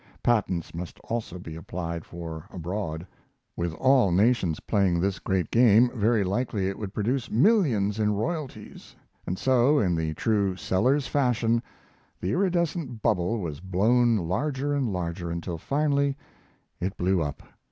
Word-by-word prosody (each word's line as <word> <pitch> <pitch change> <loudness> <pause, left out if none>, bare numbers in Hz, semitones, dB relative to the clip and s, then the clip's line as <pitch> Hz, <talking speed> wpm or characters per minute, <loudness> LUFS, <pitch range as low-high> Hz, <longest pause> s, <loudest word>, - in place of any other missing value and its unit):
Patents 95 -8 0
must 85 0 -7
also 115 -6 -4
be 80 -3 -8
applied 85 0 -5
for 80 -2 -7
abroad. 85 -2 -4 0.5
With 85 0 -2
all 130 -5 +4
nations 95 -4 +2
playing 95 -5 +1
this 95 +2 0
great 95 -4 -1
game, 120 0 +5
very 110 -2 +2
likely 100 0 -1
it 95 - -4
would 105 -3 -5
produce 115 +5 -1
millions 115 - +3
in 105 -1 +2
royalties; 130 -2 -5 0.3
and 90 - -2
so, 130 +5 +3
in 95 -9 +2
the 80 -1 -2
true 100 -2 +1
Sellers 125 +10 +1
fashion, 120 -4 +1 0.6
the 90 - -2
iridescent 170 - -1
bubble 95 +2 +1
was 80 -5 -5
blown 110 +6 +2
larger 130 - -1
and 135 -6 0
larger, 85 -1 -3
until 85 0 -4
finally 140 - +1 0.6
it 95 +3 -3
blew 90 0 +1
up. 75 -2 -4
105 Hz, 140 wpm, -26 LUFS, 90-125 Hz, 0.6 s, game